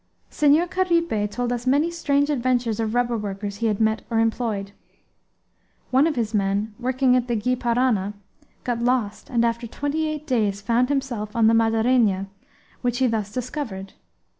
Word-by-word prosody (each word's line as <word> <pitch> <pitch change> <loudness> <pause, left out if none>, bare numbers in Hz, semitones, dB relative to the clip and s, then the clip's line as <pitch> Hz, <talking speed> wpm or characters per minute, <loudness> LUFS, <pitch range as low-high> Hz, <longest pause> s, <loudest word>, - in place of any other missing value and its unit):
Senhor 300 +3 +4
Caripe 335 - 0
told 245 +3 -2
us 245 +1 -5
many 290 +6 +3
strange 285 -3 +1
adventures 245 -4 0
of 225 0 -1
rubber 245 -1 +1
workers 200 -1 -4
he 230 - 0
had 210 -2 0
met 220 0 +1
or 230 - 0
employed. 225 -3 -1 1.2
One 265 +4 +4
of 315 - -1
his 230 -2 -2
men, 205 +1 0
working 255 +1 +2
on 250 -1 +1
the 240 - 0
Gy 250 +4 0
Parana, 235 -5 +1 0.5
got 240 -1 -2
lost 240 -4 -1
and 235 -1 +2
after 235 0 -1
twenty 290 +6 -2
eight 305 -1 -4
days 215 -7 0
found 235 +5 +1
himself 250 -7 -2
on 230 -1 +3
the 225 - +5
Madeirainha, 225 -3 +2 0.6
which 245 -1 0
he 260 - +2
thus 220 -4 -1
discovered. 230 -6 -5
235 Hz, 165 wpm, -23 LUFS, 215-260 Hz, 1.2 s, the